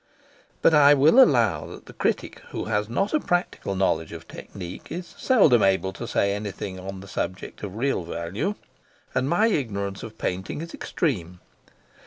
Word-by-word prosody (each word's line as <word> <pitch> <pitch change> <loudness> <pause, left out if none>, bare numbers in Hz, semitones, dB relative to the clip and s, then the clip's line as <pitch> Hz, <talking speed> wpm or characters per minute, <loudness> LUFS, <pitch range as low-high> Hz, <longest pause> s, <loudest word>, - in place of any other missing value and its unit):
But - - +6
I 145 -1 +7
will 155 - +7
allow 110 - +2
that - - -11
the - - -12
critic - - -1
who - - -4
has 105 -1 -1
not 195 - 0
a 310 - +4
practical 175 - -1
knowledge 80 -4 0
of 85 0 -9
technique 90 -3 -9
is 180 +1 -4
seldom 175 - +4
able 95 0 +2
to - - -6
say 100 0 +1
anything 100 -2 -5
on 95 0 -7
the 100 - -11
subject 95 0 -4
of 100 -2 -6
real 135 -1 0
value, 85 - -3 0.6
and 130 +2 0
my 190 +7 +3
ignorance 100 - -1
of 110 -1 -9
painting 95 +8 -3
is 170 0 -8
extreme. 90 - -2
105 Hz, 170 wpm, -25 LUFS, 95-145 Hz, 0.6 s, I